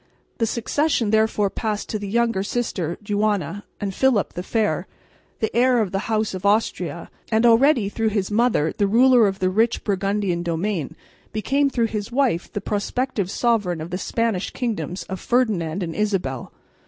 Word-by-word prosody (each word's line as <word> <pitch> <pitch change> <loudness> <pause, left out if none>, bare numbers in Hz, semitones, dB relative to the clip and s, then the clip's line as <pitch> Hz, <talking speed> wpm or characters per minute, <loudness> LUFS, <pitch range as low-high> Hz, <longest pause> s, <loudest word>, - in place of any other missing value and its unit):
The 225 - +2
succession 235 0 0
therefore 220 -2 +2
passed 215 -2 -3
to 215 - -2
the 205 - -5
younger 230 -1 +1
sister, 195 -6 -2
Juana; 205 -3 -1
and 200 -2 -3
Philip 255 -2 +2
the 180 - -4
Fair, 215 +3 -1 0.5
the 220 - -1
heir 250 0 +4
of 205 -5 0
the 195 +3 -3
House 215 -2 0
of 185 - -6
Austria 210 +3 0 0.2
and 220 +1 +3
already 240 -1 +5
through 220 +2 0
his 205 -2 -1
mother 215 -8 +2
the 200 - +1
ruler 240 +1 +5
of 195 -1 -2
the 185 -1 0
rich 225 +4 +1
Burgundian 195 -3 0
domain, 170 -1 -2 0.4
became 275 +6 +1
through 240 -3 +1
his 210 -1 -4
wife 245 -9 0
the 205 - -4
prospective 210 0 -2
sovereign 205 -7 +1
of 160 +2 -7
the 180 - -2
Spanish 225 -3 -1
kingdoms 220 -6 -3
of 190 -1 -6
Ferdinand 200 -8 0
and 165 -1 -4
Isabel. 190 - -2
210 Hz, 165 wpm, -22 LUFS, 190-230 Hz, 0.5 s, already